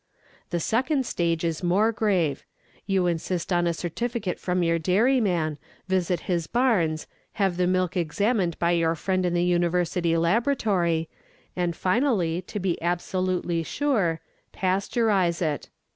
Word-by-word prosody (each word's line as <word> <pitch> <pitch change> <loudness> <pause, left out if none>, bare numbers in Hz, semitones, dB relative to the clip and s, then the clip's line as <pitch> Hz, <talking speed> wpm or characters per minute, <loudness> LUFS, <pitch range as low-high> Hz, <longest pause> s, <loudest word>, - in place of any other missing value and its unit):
The 175 - -1
second 260 - 0
stage 170 -5 -1
is 165 -2 -1
more 195 +6 +3
grave. 190 -9 0 0.4
You 190 -2 +2
insist 175 +1 -1
on 175 0 +2
a 170 - +1
certificate 200 +3 -3
from 180 -1 0
your 165 0 +2
dairyman, 180 - +1 0.3
visit 180 -2 0
his 170 -3 -1
barns, 185 -11 +1 0.3
have 195 -4 0
the 180 0 +1
milk 185 -1 0
examined 180 +2 0
by 170 0 +1
your 165 -1 +2
friend 185 +2 0
in 175 - -1
the 175 - +2
university 175 -1 +1
laboratory, 175 - +1 0.5
and 175 -2 -1
finally, 185 - +1
to 195 +3 -6
be 185 -3 -1
absolutely 175 0 -1
sure, 195 - 0 0.3
pasteurize 190 -2 +1
it. 155 -4 -2
180 Hz, 135 wpm, -25 LUFS, 170-200 Hz, 0.5 s, more